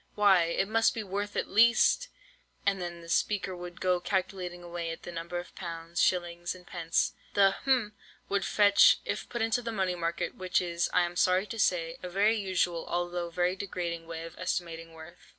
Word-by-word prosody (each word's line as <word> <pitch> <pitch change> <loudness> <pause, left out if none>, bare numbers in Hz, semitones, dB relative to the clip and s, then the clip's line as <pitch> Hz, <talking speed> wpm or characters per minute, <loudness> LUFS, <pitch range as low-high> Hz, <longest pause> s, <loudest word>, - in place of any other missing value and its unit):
Why, 195 -4 +5
it 170 +3 0
must 225 +2 +2
be 225 - -3
worth 205 +1 -4
at - - -1
least—' 235 - +4 0.6
and 195 -2 +1
then 175 -1 -5
the 165 - -12
speaker 190 +2 0
would 175 -1 -9
go 180 -1 +2
calculating 180 -1 -3
away 170 -1 -4
at 165 - -7
the 175 - -7
number 170 +1 -5
of 175 0 -7
pounds, 170 -1 -4
shillings, 175 -1 0
and 180 -1 -15
pence, 165 -1 0 0.2
the—hm—would 205 -1 +1
fetch, 205 0 +6
if - - -4
put 240 -2 -2
into 225 +2 +1
the 230 -1 -4
money 190 -4 0
market, 170 0 -2
which 185 -1 0
is, 175 -1 -1
I 180 - +4
am 175 0 -3
sorry 185 +2 +3
to 225 +1 -7
say, 165 -4 +1
a 180 - -6
very 205 +5 +3
usual, 185 -4 -1
although 175 0 -2
very 180 +2 0
degrading 175 -4 -4
way 165 -1 -6
of 165 0 -9
estimating 165 -1 -3
worth. 160 +2 -12
180 Hz, 185 wpm, -29 LUFS, 170-200 Hz, 0.6 s, fetch